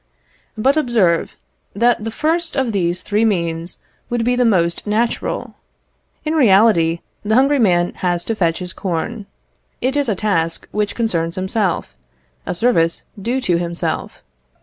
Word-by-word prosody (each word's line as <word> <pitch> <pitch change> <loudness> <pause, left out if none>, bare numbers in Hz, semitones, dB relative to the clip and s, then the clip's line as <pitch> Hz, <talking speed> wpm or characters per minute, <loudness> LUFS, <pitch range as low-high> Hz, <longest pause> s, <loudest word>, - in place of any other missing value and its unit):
But 270 +7 +2
observe, 220 - +1 0.4
that 235 +1 +2
the 225 - -2
first 325 +7 0
of 265 -4 0
these 180 -2 -1
three 210 +2 +1
means 170 -5 -1 0.3
would 240 -1 -1
be 245 +1 +2
the 250 - +2
most 175 -5 +1
natural. 225 +3 -1 0.7
In 310 - 0
reality, 195 - +4 0.2
the 215 +1 0
hungry 275 +3 +4
man 175 -6 +2
has 175 -1 0
to 225 - -2
fetch 170 -6 +1
his 180 -1 -5
corn. 200 +4 -3 0.5
It 260 +2 -1
is 285 -4 +1
a 210 - +1
task 165 -5 -1
which 210 -1 -1
concerns 170 -8 -1
himself, 190 - -1 0.5
a - - -2
service 170 -6 +1 0.2
due 245 +6 -1
to 175 -8 +1
himself. 170 0 -4
210 Hz, 150 wpm, -19 LUFS, 175-240 Hz, 0.7 s, reality